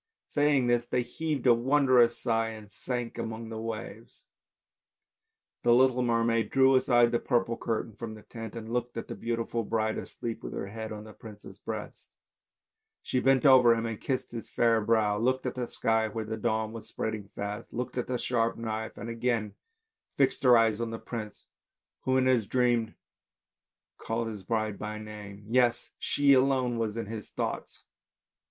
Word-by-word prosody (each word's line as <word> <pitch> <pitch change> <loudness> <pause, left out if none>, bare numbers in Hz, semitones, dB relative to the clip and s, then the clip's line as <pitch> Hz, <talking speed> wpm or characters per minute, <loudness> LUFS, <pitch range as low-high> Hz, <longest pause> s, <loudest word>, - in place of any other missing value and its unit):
" - - -64
saying 145 -3 +2
this 120 0 +1
they 125 -1 0
heaved 155 +2 -3
a 125 - +7
wondrous 125 -1 +4
deep - - -13
sigh 115 -2 +1
and 110 -2 -9
sank 125 +3 -4
among 110 0 -5
the 110 -1 -5
waves. 115 0 -7 1.4
The 120 0 +5
little 130 0 +4
mermaid 115 -2 +1
drew 135 0 +5
aside 120 -2 +4
the 120 - +1
purple 120 -2 +1
curtain 115 -2 -3
from 110 -2 -6
the 105 - -13
tent 115 -1 -8
and 115 0 -6
looked 120 -1 -2
at 115 - -4
the - - -5
beautiful 115 0 -2
bride 110 0 -1
asleep 115 -1 -6
with - - -6
her - - -3
head 110 +1 -6
on 105 -1 -6
the 110 0 -12
prince's 105 -2 -12
breast; - - -7 0.9
she 130 - 0
bent 135 +2 +3
over 125 -4 +7
him 115 0 -2
and 115 -2 -4
kissed 130 -2 -2
his 115 -1 -7
fair 115 -1 +3
brow, 105 -1 +2
looked 130 +3 +1
at 125 - -1
the 125 -2 -3
sky 110 -1 +1
where 110 +1 -4
the 110 +1 -3
dawn 110 0 -1
was 115 -1 -9
spreading 110 -2 -4
fast; 100 +1 -5
looked 125 +1 -4
at 125 - -2
the 125 - -1
sharp 115 -2 0
knife, 110 -1 -4
and 115 - -6
again 115 -2 -1 0.6
fixed - - +2
her 125 -3 +7
eyes 115 -1 +2
on 115 - -2
the 115 - -4
prince 110 -3 -7 0.6
who, 130 0 +3
in 130 - +3
his 125 -5 +3
dream 120 -2 +1 1.0
called 115 +1 -2
his 105 -3 -6
bride 110 +1 -2
by 105 0 -4
name, 105 -1 -9
yes! 120 0 +2
she 140 -1 +3
alone 130 -2 +2
was 110 -1 -2
in 115 - -2
his 110 0 -7
thoughts! - - -4
115 Hz, 185 wpm, -29 LUFS, 110-125 Hz, 1.4 s, a